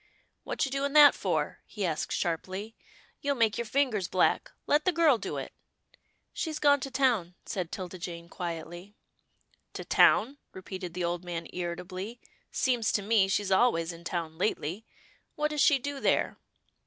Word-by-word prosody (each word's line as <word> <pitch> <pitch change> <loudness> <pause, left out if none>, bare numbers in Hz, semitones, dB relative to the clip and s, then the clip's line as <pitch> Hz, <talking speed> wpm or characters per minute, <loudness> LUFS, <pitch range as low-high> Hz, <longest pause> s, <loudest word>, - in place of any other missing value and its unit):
" - - -46
What - - -1
you 270 - -5
doing 275 +1 -1
that 295 -1 +9
for? - - -2
" - - -46
he 210 -3 -3
asked, 160 -3 -2
sharply, 190 +6 -3 0.2
" - - -30
you'll 285 -1 0
make 225 -4 +2
your 235 - -2
fingers 225 -7 +1
black. 185 - +2 0.2
Let 295 +1 +3
the 370 - +3
girl 325 -8 +4
do - - -4
it." - - -6 0.4
" - - -47 0.3
She's 315 -2 -3
gone 285 -1 +4
to 275 - -5
town," 240 -10 +1
said 180 -4 -4
'Tilda 185 -1 -6
Jane, 170 -1 -6
quietly. 175 +3 -6 0.4
" - - -41
To - - -6
town," 270 +6 +4
repeated 185 -2 -7
the 180 - -2
old 175 +1 -2
man, 170 -2 -5
irritably, 185 +5 -5 0.2
" - - -38
seems 245 -4 +1
to 205 - 0
me, 210 -2 +3
she's 195 0 0
always 180 -5 +3
in 165 0 -12
town 165 -2 -4
lately. 190 +1 -2 0.5
What 300 0 0
does 300 -1 0
she 290 -1 +6
do 280 +2 -5
there? - - +1
200 Hz, 185 wpm, -29 LUFS, 175-270 Hz, 0.5 s, that